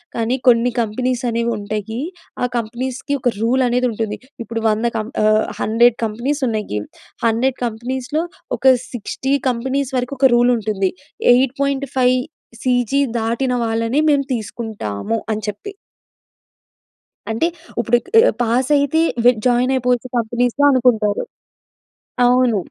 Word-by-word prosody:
కానీ 235 +3 0
కొన్ని 240 0 +5
కంపెనీస్ 250 +3 -2
అనేవి 235 +1 0
ఉంటాయి. 215 +2 -4 0.4
ఆ - - +4
కంపెనీస్‌కి 255 +5 -3
ఒక 245 - +2
రూల్ 250 +3 +2
అనేది 250 +1 +1
ఉంటుంది. 220 -1 -3 0.2
ఇప్పుడు 225 0 -4
100 215 +2 0
కం 215 +1 -3 0.2
ఆహ్, 215 0 +4 0.2
100 235 +2 +3
కంపెనీస్ 250 +7 -2
ఉన్నాయి. 210 - -2 0.5
100 245 +4 +1
కంపెనీస్‌లో 255 +7 -3 0.3
ఒక - - -11 0.3
60 260 +4 -3 0.2
కంపెనీస్ 265 +3 -2
వరకు 250 +3 -2
ఒక 265 - +6
రూల్ 245 +1 +4
ఉంటుంది. 200 -3 -1 0.4
8.5 270 0 +1 0.5
సీజీ 250 +1 +1 0.2
దాటిన 235 +3 -1
వాళ్ళని 230 +4 0
మేము 280 -1 +3
తీసుకుంటాము" 220 - -4
అని 215 - -2
చెప్పి. 210 - -7 1.6
అంటే 275 +10 +1 0.3
ఇప్పుడు 240 +1 +3
క్ - - -15 0.2
ఆహ్, - - +2
పాస్ 245 +4 +1
అయితే 285 +3 +2 0.2
వ్ - - +8 0.2
జాయిన్ 250 +2 +2
అయిపోవచ్చు 250 -1 0
కంపెనీస్‌లో 240 +4 +1
అనుకుంటారు. 230 -5 +2 1.0
అవును. 245 -3 +3
240 Hz, 125 wpm, -19 LUFS, 225-260 Hz, 1.6 s, వ్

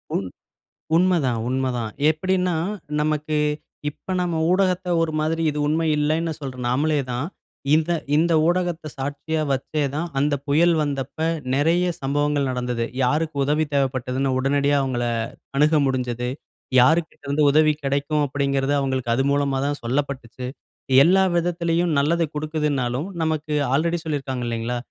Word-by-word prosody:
உண் 95 - -1 0.7
உண்மைதான், 165 -10 +2
உண்மைதான். 125 -4 -1 0.2
எப்படினா 180 +2 0 0.5
நமக்கு 150 0 0 0.5
இப்போ 185 - -9
நாம் 175 -2 -1 0.2
ஊடகத்த 185 -1 +1
ஒரு 160 -1 0
மாதிரி 160 +1 0
இது 150 0 -3
உண்மை 160 +1 +1
இல்லன்னு 160 +2 0
சொல்ற 130 -2 -5
நாமளே 150 +5 +1
தான், 125 +5 -2 0.5
இந்த 160 +2 +1 0.3
இந்த 165 +2 +3
ஊடகத்தை 175 -3 0
சாட்சியா 145 +3 -3
வச்சே 145 +3 -1
தான், 170 +3 -1
அந்த 145 +1 +1
புயல் 165 +4 +4
வந்தப்ப 140 +1 -4 0.4
நிறைய 165 +5 +2 0.2
சம்பவங்கள் 145 0 0
நடந்தது. 125 -2 -2 0.2
யாருக்கு 150 +4 0
உதவி 150 +2 +1
தேவைப்பட்டதுனு 130 -1 0
உடனடியா 140 +1 +2
அவங்களை 120 -3 -1 0.5
அணுக 150 +1 +4
முடிஞ்சது. 125 -2 -2 0.5
யாருக்கிட்டருந்து 150 0 +2
உதவி 155 0 +4
கிடைக்கும் 145 +2 0
அப்படிங்கிறது 140 0 0
அவங்களுக்கு 130 -3 -1
அது 135 - +1
மூலமா 140 -1 +1
தான் 145 0 -2
சொல்லப்பட்டுச்சு. 130 -1 -3 0.6
எல்லா 190 +3 +5
விதத்திலயும். 170 -1 +1
நல்லது 165 +3 +2
கொடுக்குதுனாலும், 150 -2 -1
நமக்கு 155 -1 -1 0.2
ஆல்ரெடி 170 +4 +1
சொல்லியிருக்கிறாங்க 135 -5 -3
இல்லைங்களா, 115 +1 -2
145 Hz, 125 wpm, -23 LUFS, 135-160 Hz, 0.7 s, எல்லா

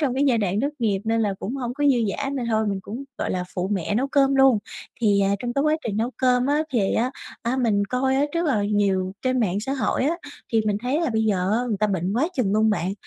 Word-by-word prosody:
trong 270 -5 0
cái 275 - +2
giai 235 - +3
đoạn 200 0 0
thất 285 +2 -1
nghiệp 210 -5 0
nên 225 +1 +1
là 205 -3 0
cũng 240 +7 -4
hông 245 -2 -4
có 290 - -1
dư 275 -3 +5 0.2
dả 275 -1 -2
nên 260 -4 -3
thôi 220 0 +1
mình 200 -2 -1
cũng, 235 +8 -7
gọi - - -2
là, 180 -1 -2
phụ 180 - -2
mẹ 195 +1 -1
nấu 255 +5 +1
cơm 275 -1 +3
luôn. 270 -4 +5 0.4
Thì, 205 -3 +3
à, 195 0 +2
trong 240 +3 -3
cái 275 +3 +1
quá 305 +1 +2
trình 205 - -2
nấu 230 +3 0
cơm 250 -1 +2
á, 295 +2 +2
thì 205 -6 +1
á, 245 +3 +1 0.3
á, 240 +2 -1
mình 220 -6 +2
coi 255 +5 0
á 280 - +3
rất 340 0 0
là 225 -9 +1
nhiều 195 -3 +1
trên 255 -1 +1
mạng 200 -2 0
xã 265 +6 -3
hội 265 -1 0
á, 325 +4 +1 0.4
thì 225 - +4
mình 205 -1 +1
thấy 265 +6 0
là 330 - 0
bây 220 -1 +1
giờ 195 -3 +1
á, 225 - +2
người 210 - 0
ta 215 - +3
bệnh 190 -1 -1
quá 295 +7 +2
chừng 205 -6 +1
luôn 215 +1 +3
bạn, 190 -2 -1
230 Hz, 280 wpm, -23 LUFS, 205-265 Hz, 0.4 s, dư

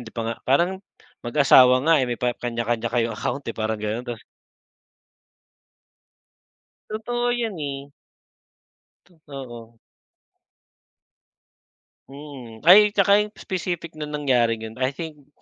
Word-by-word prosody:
Hindi - - -18
pa 115 - -2
nga - - -7
parang 175 +8 +2 0.4
mag-asawa 130 0 +5
nga, 165 0 +5
eh, 130 - -1
may 120 - -2
pa 125 -2 0
kanya-kanya 120 -1 -3
kayong 115 -1 0
account, 140 +5 -4
eh, 115 - -4
parang 110 0 -2
ganon. 110 +4 -4
Ta 120 - -4 2.7
Totoo 240 +3 -2
yan, 225 -7 -3
eh. 140 0 -6 1.1
Totoo. 130 -9 -11 2.3
Mm. 135 -5 -11
Ay 200 +5 +8
tsaka 200 0 +4
yung 210 - -2
specific 175 -3 -4
na 150 -1 -7
nangyari 125 -6 +1
ganon. 110 +3 -9
I 130 +1 -1
think, 150 -4 -8
135 Hz, 115 wpm, -23 LUFS, 120-165 Hz, 2.7 s, Ay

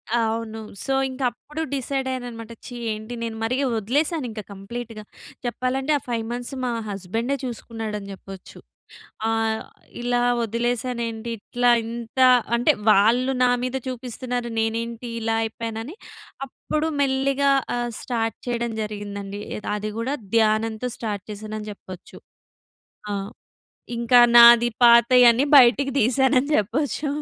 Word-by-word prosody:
అవును. 225 -1 -1 0.3
సో, - - -3 0.2
ఇంక 260 +1 -8
అప్పుడు 300 +6 -8
డిసైడ్ 270 0 -2
అయ్యాను 255 -1 -3
అన్నమాట. 230 -1 -9
ఛీ, 245 - -8 0.2
ఏంటి 215 +2 -6
నేను 225 -1 -4
మరి 230 +3 0 0.2
వదిలేసాను 285 - 0
ఇంకా 215 -1 -7
కంప్లీట్‌గా. 215 +2 -7 0.4
చెప్పాలంటే, 255 +4 -1
ఆ - - -8
5 230 -2 -2
మంత్స్ 245 +2 -5
మా 245 - 0 0.2
హస్బాండె 205 +7 -2
చూసుకున్నాడు 225 -3 -5
అని 200 0 -10
చెప్పొచ్చు. 195 -1 -12 0.7
ఆహ్, 225 0 0 0.4
ఇలా 245 0 +1 0.2
వదిలేసాను 235 +2 -1
ఏంటి. 225 +1 -6
ఇట్లా 245 +3 +1
ఇంత 235 +2 -5 0.4
అంటే, 255 +5 +3 0.2
వాళ్ళు 240 +6 +4
నా 250 - +4
మీద 255 +1 -2
చూపిస్తున్నారు 245 -1 -4
నేనేంటి 230 +1 -3
ఇలా 225 0 0
అయిపోయానని. 225 - -5 0.5
అప్పుడు 305 +4 -3
మెల్లిగా 275 +1 +2 0.3
ఆహ్, 240 0 -2
స్టార్ట్ 225 -3 -2
చేయడం 235 -1 -1
జరిగిందండి. 205 -1 -6 0.2
ఏది - - -7
అది 210 0 -4
కూడా 255 +5 -1 0.2
ధ్యానంతో 220 +2 +1
స్టార్ట్ 205 -4 -4
చేశానని 215 +1 -7
చెప్పొచ్చు. 185 -3 -12 0.9
ఆ! - - -1 0.9
ఇంకా 235 +1 +4 0.2
నాది 235 0 +9
పాతయ‌న్ని 240 +1 +6
బయటికి 265 +2 +5
తీశానని 265 +4 +3
చెప్పొచ్చు 275 +7 -1
235 Hz, 125 wpm, -23 LUFS, 220-255 Hz, 0.9 s, నాది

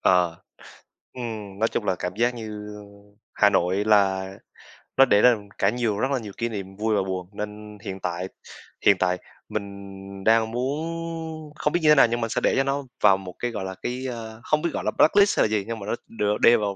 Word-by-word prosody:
Ờ. 90 -3 +3 0.7
Ừm, 110 -5 -6
nói 115 - +3
chung 105 - -2
là 95 -2 +1
cảm 90 +1 -4
giác 120 +2 +2
như, 105 -2 -7
a, 105 - -10 0.5
Hà 105 - +5
Nội 95 +1 +1
là 95 -3 +3 0.7
nó 135 - +8
để 105 -5 +4
ra 125 -1 +7 0.2
cả 100 - +3
nhiều 110 -3 -1
rất 130 - 0
là 135 - +1
nhiều 105 -4 -8
kỷ 115 0 -1
niệm 95 -3 -6
vui 110 +1 0
và 100 - +2
buồn. 95 -1 -4
Nên 105 0 -7
hiện 95 -3 -5
tại 90 +1 -3 0.6
hiện 100 - +6
tại, 90 0 +2 0.3
mình 100 -2 -4 0.5
đang 110 0 +4
muốn, 160 +3 -4
không 150 - -1
biết 175 - +3
như 155 - +5
thế 150 - +8
nào 135 - +7
nhưng 120 +1 -2
mình 115 - -1
sẽ - - -1
để - - +3
cho 135 - +4
nó 140 +1 -1 0.2
vào 95 - +7
một 95 -2 -9
cái, 120 -1 -2
gọi 105 -4 -4
là, 95 - -5
cái, 125 +2 -3
a, 110 -2 -7
không 155 0 +1
biết 170 - 0
gọi - - -3
là - - 0
blacklist 200 +5 +4
hay - - +6
là - - -7
gì. 105 -2 0
Nhưng 115 -1 -4
mà 100 - -7
nó, - - -3 0.2
ừm, 115 - -15
được 105 0 +1
đê 120 - +7
vào 100 -2 -2
110 Hz, 235 wpm, -25 LUFS, 100-125 Hz, 0.7 s, nó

